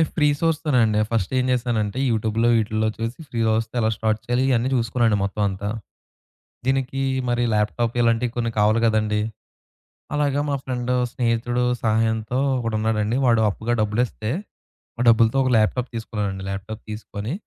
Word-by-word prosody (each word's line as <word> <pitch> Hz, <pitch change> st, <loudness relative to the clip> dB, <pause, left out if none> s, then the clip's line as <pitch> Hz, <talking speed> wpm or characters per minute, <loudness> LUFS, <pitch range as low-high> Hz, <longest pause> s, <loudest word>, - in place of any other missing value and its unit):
Free source 150 Hz, +1 st, +2 dB
తోనే 145 Hz, -6 st, +2 dB
అండి. 105 Hz, -1 st, +1 dB
First 110 Hz, -3 st, 0 dB
ఏం 130 Hz, -, +2 dB
చేశానంటే 120 Hz, -3 st, -1 dB
యూట్యూబ్‌లో, 110 Hz, +1 st, +1 dB
వీటిల్లో 110 Hz, 0 st, +1 dB
చూసి, 115 Hz, +2 st, -4 dB
ఫ్రీ‌గా 115 Hz, -3 st, 0 dB
వస్తే, 115 Hz, +1 st, -6 dB
ఎలా 110 Hz, -1 st, +2 dB
స్టార్ట్ 110 Hz, 0 st, 0 dB
చేయాలి 120 Hz, +2 st, +1 dB
ఇయన్నీ 125 Hz, 0 st, +2 dB
చూసుకునానండి 115 Hz, -2 st, +2 dB
మొత్తం 100 Hz, +2 st, -2 dB
అంతా. 100 Hz, +1 st, -4 dB, 1.0 s
దీనికి 135 Hz, 0 st, 0 dB, 0.3 s
మరి 120 Hz, 0 st, +1 dB
ల్యాప్‌టాప్‌‍ 110 Hz, +3 st, 0 dB
ఇలాంటియి 115 Hz, +1 st, +2 dB
కొన్ని 115 Hz, -1 st, 0 dB
కావాలి 110 Hz, +2 st, +4 dB
కదండీ. 110 Hz, -1 st, +1 dB, 1.0 s
అలాగే 145 Hz, -1 st, +1 dB
మా 140 Hz, -, +1 dB
ఫ్రెండ్, 125 Hz, -1 st, -3 dB, 0.2 s
స్నేహితుడు 120 Hz, 0 st, 0 dB, 0.2 s
సహాయంతో 110 Hz, +1 st, +1 dB, 0.2 s
ఒకడు 115 Hz, -3 st, -2 dB
ఉన్నాడండి, 110 Hz, +2 st, 0 dB
వాడు 115 Hz, -2 st, +4 dB
అప్పుగా 110 Hz, +4 st, -2 dB
డబ్బులు 105 Hz, +3 st, +1 dB
ఇస్తే, 110 Hz, 0 st, -5 dB, 0.7 s
ఆ -, -, 0 dB
డబ్బులతో 115 Hz, +3 st, +4 dB
ఒక 130 Hz, -, +1 dB
ల్యాప్‌టాప్‌‍ 120 Hz, +3 st, +1 dB
తీసుకున్నానండి. 100 Hz, -4 st, -4 dB
ల్యాప్‌టాప్‌‍ 100 Hz, +3 st, -6 dB
తీసుకొని, 105 Hz, +2 st, -5 dB
115 Hz, 150 wpm, -23 LUFS, 110-125 Hz, 1.0 s, కావాలి